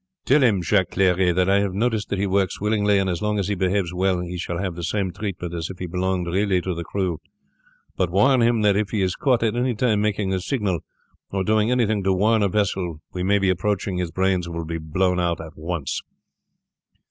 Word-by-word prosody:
"Tell 140 +3 +4
him, 105 -8 +3
Jacques 95 +1 +2
Clery, 90 -1 +3
that 90 +1 +1
I 100 +1 +4
have 100 -2 -1
noticed 110 0 0
that 100 - -1
he 100 - 0
works 95 -1 0
willingly, 105 -1 +2
and 95 -1 +1
as 90 -2 -2
long 105 0 0
as 100 -1 -1
he - - +1
behaves 95 -1 0
well 95 0 +1
he 90 0 -5
shall 85 -1 -3
have 95 -1 -2
the 85 0 -7
same 95 +1 -1
treatment 90 -4 -5
as 85 -1 -4
if 95 - -8
he 90 - -5
belonged 90 +1 -1
really 95 +2 +1
to 90 +1 -2
the 85 0 -5
crew; 90 -3 -2 0.7
but 90 - 0
warn 120 +8 +4
him 115 -1 +3
that 100 -1 +4
if 105 0 0
he 105 -4 0
is 90 0 0
caught 125 -4 +1
at 115 0 +1
any 125 0 0
time 105 -2 +1
making 105 -2 0
a 95 - 0
signal, 100 - -1 0.5
or 95 -1 -1
doing 110 +2 +2
anything 110 -5 +1
to 95 0 +2
warn 110 +4 +2
a 100 - +2
vessel 95 -5 -1
we 90 - -3
may 100 +3 +3
be 95 -2 +2
approaching, 95 0 -1
his 90 -1 -2
brains 95 0 0
will 85 -1 -4
be 80 +1 -4
blown 90 +4 0
out 85 -1 0
at 80 -1 -9
once." 80 -3 -3
95 Hz, 230 wpm, -23 LUFS, 90-105 Hz, 0.7 s, Tell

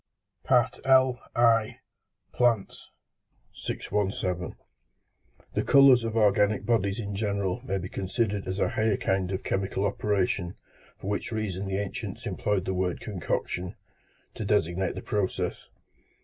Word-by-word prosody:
T. 130 - +6 0.3
LI. 120 -4 +3 0.5
PLANTS. 115 -5 0 0.6
617. 95 -3 -2 1.0
The - - +1
colours 135 -3 +6
of 115 0 -2
organic 105 -1 +3
bodies 100 -3 +1
in 100 -2 -4
general 100 -2 -1
may 95 - -2
be 90 -1 -4
considered 100 +1 -2
as 95 +2 -3
a - - +2
higher 110 -2 +1
kind 95 -1 0
of 95 - -3
chemical 95 +1 -1
operation, 95 -3 0 0.4
for - - -12
which 105 +3 -2
reason 100 -3 -3
the 95 0 -1
ancients 100 -1 -5
employed 100 -3 -1
the 95 - -1
word 90 -1 -1
concoction, 90 -2 -3
πέψις, - - -38
to - - -5
designate 85 +3 +1
the - - -6
process. 105 -3 -2
100 Hz, 130 wpm, -27 LUFS, 95-110 Hz, 1.0 s, T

